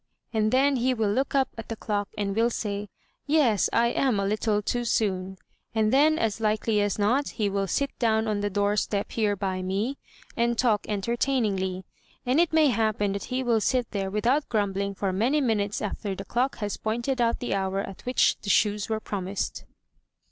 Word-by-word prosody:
and 215 -1 +1
then 270 +1 +3
he 255 +1 +1
will 220 -3 +1
look 265 +6 0
up 270 -1 +3
at 225 - -8
the 225 - -3
clock 205 -2 -2
and 200 -1 -1
will 230 +2 +3
say, 205 -3 -4 0.4
'Yes, 275 - +3
I 235 0 +3
am 245 -4 +1
a 200 - 0
little 210 +1 +1
too 240 +3 -1
soon;' 190 -5 -1 0.4
and 220 0 +2
then, 305 +3 +5
as 225 -3 -1
likely 215 0 +1
as 205 -1 0
not, 240 +8 +1
he 215 -3 +1
will 195 0 -1
sit 280 +9 0
down 220 -2 +2
on 210 -1 0
the 205 0 -1
door 205 +1 +1
step 205 -1 -1
here 210 -3 +1
by 190 -1 -2
me 200 +9 -2 0.4
and 235 0 +1
talk 220 -5 +2
entertainingly; 205 -4 -1 0.4
and 255 +5 +2
it 345 -1 +3
may 315 -2 +5
happen 215 -4 +1
that 200 0 -4
he 260 0 -2
will 230 -3 +2
sit 250 +1 0
there 195 -2 -2
without 240 +9 +1
grumbling 200 -2 -1
for 195 -1 -1
many 240 +10 +2
minutes 215 -7 0
after 200 -1 -3
the 195 - -7
clock 250 +5 0
has 205 -2 -3
pointed 240 +4 -1
out 230 -1 +2
the 245 - -2
hour 195 0 -1
at 195 -1 -8
which 250 0 +2
the 205 - -5
shoes 205 +1 +2
were 220 -1 0
promised. 195 -2 -4
215 Hz, 200 wpm, -26 LUFS, 200-240 Hz, 0.4 s, then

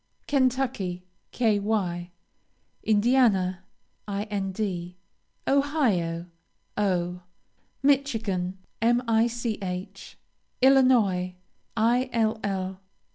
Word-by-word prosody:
Kentucky, 255 -10 0 0.3
Ky. 220 -4 +2 1.2
Indiana, 205 -5 +3 0.4
Ind. 195 -3 -3 0.5
Ohio, 235 - +1 0.5
O. 180 -3 0 0.6
Michigan, 225 -10 +1 0.2
Mich. 230 -5 0 0.4
Illinois, 240 -9 +4 0.5
Ill. 220 -6 0
210 Hz, 45 wpm, -26 LUFS, 185-245 Hz, 1.2 s, Illinois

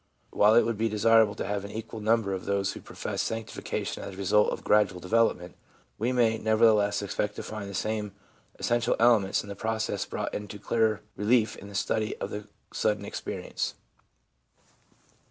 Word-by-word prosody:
While 105 +2 +5
it 120 - +7
would 115 -2 -2
be 115 0 +1
desirable 110 0 +4
to - - -4
have 100 -1 -2
an 100 - -7
equal 110 +1 -6
number 110 -2 +1
of 95 - -5
those 100 0 0
who - - -9
profess - - -4
sanctification 115 -1 -4
as - - -6
the - - -11
result 100 +2 +3
of - - -5
gradual 105 -3 +3
development, 90 -2 +1 0.5
we 120 +3 +1
may, 115 -3 +2
nevertheless, 105 -2 +3
expect 105 +1 -2
to - - -6
find 105 -2 -6
the 100 - -7
same 105 0 -2 0.4
essential 120 0 +1
elements 115 -5 +3
in 100 - -11
the 100 - -5
process 110 +1 -2
brought - - -4
into 105 0 -5
dearer 110 0 +1
relief 110 +1 +2
in 100 - -11
the 100 - -10
study 110 +2 -1
of - - -5
the 105 0 -6 0.3
sudden - - 0
experience. - - -4
105 Hz, 175 wpm, -28 LUFS, 100-115 Hz, 0.5 s, it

